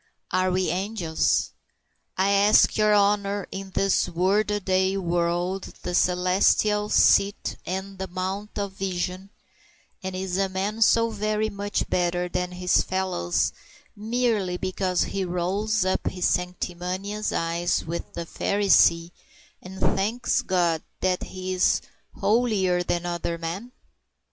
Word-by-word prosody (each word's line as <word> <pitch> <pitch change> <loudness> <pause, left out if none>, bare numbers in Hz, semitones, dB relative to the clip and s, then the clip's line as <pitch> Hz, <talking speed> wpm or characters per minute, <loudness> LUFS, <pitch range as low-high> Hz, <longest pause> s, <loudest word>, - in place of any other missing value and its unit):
Are 185 +1 +2
we 185 -1 0
angels? 180 -2 0 0.7
I 190 +2 +2
ask 200 +2 +5
your 215 0 +3
honor 205 -1 +2
is 195 0 -6
this 195 -1 +2
work 190 +5 +1
a 210 0 0
day 190 0 +1
world 175 +1 -1
the 180 - -3
celestial 185 +4 +2
seat 200 -1 +3
and 190 +1 -4
the 190 - -3
Mount 190 +3 -4
of 200 -1 -2
Vision, 185 0 -3 0.7
and 190 -1 -5
is 185 -1 -3
a 195 -1 +1
man 200 +4 -3
so 230 +1 +4
very 215 0 -1
much 200 0 -2
better 175 0 0
than 180 0 -3
his 180 0 +2
fellows 185 - -1 0.4
merely 215 -4 0
because 185 -1 0
he 195 - -3
rolls 185 +4 0
up 190 - 0
his 180 -1 0
sanctimonious 180 +3 -2
eyes 170 +1 -1
with 170 +1 -5
the 170 - -5
Pharisee 175 -3 +3 0.5
and 190 +1 -10
thanks 215 +6 +1
God 170 -3 +1 0.2
that 185 -1 +1
he 185 0 -5
is 185 - +3 0.4
holier 205 -6 +1
than 175 0 -2
other 170 -1 -3
men? 175 +9 -5
190 Hz, 130 wpm, -25 LUFS, 180-205 Hz, 0.7 s, ask